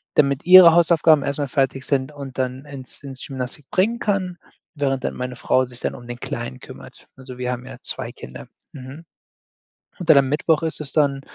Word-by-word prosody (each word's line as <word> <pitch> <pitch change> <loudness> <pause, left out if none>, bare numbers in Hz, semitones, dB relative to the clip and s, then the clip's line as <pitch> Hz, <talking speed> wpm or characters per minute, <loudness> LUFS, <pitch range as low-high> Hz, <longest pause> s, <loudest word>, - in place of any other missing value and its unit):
damit 140 0 +2
ihre 180 -2 +9
Hausaufgaben 165 -3 +4
erst 140 +1 -3
mal 145 - -1
fertig 135 -1 -1
sind 135 0 -1
und 140 -3 -9
dann 130 +2 -3
ins 140 -2 -10
ins 135 -2 -8
Gymnastic 130 +1 -6
bringen 225 +6 +1
kann, 185 -4 -1 0.4
während 135 -2 -1
dann - - -2
meine 125 0 -5
Frau 130 +1 +1
sich 125 0 -13
dann - - -3
um 120 -1 -12
den 120 0 -7
Kleinen 65 0 -6
kümmert. - - -13
Also, 130 -1 -10
wir 125 0 -2
haben 125 0 -5
ja - - -10
2 - - -5
Kinder. 65 - -11 0.3
Mhm, 140 +4 -10 0.9
und 170 -3 -2
dann 145 - +8
am 135 -1 +2
Mittwoch 155 +2 +1
ist 160 -1 -3
es 145 - -6
dann, 140 -3 +1
140 Hz, 200 wpm, -21 LUFS, 130-155 Hz, 0.9 s, ihre